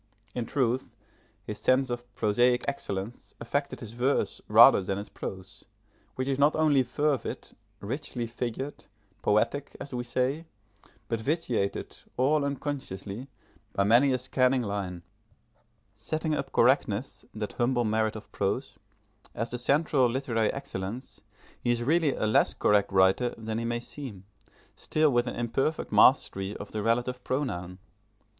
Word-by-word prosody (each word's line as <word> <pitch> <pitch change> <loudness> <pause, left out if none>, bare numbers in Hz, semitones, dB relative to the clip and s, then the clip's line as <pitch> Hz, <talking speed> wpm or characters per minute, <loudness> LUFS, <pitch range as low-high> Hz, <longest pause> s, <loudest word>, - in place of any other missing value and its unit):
In 120 -2 -3
truth, 130 -1 -1 0.5
his 105 0 -6
sense 130 +3 +2
of 120 0 -5
prosaic 120 +4 +2
excellence 110 -5 -4
affected 140 +5 -2
his 110 -3 -6
verse 125 +4 0
rather - - +8
than 95 +1 -2
his 100 - -6
prose, 95 -1 -7 0.5
which 130 0 -2
is 135 0 0
not 145 +2 +4
only 155 -3 +4
fervid, 140 +2 -1 0.3
richly 125 +2 -3
figured, 120 +4 -5 0.4
poetic, 120 +7 +1
as 140 - -7
we 120 -1 -2
say, 130 +6 -1 0.6
but 115 - -1
vitiated, 125 - -2 0.2
all 140 +4 +3
unconsciously, 135 -6 -4 0.5
by 100 - +2
many 120 +7 +5
a 130 - +2
scanning 130 0 +2
line. 95 -4 -4 0.9
Setting 155 0 -2
up 140 -2 -3
correctness, 125 -1 +2
that 105 -1 -4
humble 120 0 +1
merit 110 0 +1
of 110 - -10
prose, 125 +8 -2 0.6
as 115 +2 -3
the 125 - -2
central 140 -1 +3
literary 115 -3 0
excellence, 125 -3 -6 0.4
he 120 - 0
is 120 0 +1
really 155 +1 +2
a - - -1
less 110 - +3
correct 105 -1 +3
writer 95 +6 +3
than 110 0 -3
he 115 - -3
may 120 0 -1
seem, 120 -6 -8 0.5
still 155 -1 +1
with 120 0 +2
an - - -3
imperfect 120 +6 -1
mastery 95 +1 +4
of 100 - -9
the 105 - -3
relative 120 +3 0
pronoun. 90 -10 -3
120 Hz, 140 wpm, -28 LUFS, 110-135 Hz, 0.9 s, rather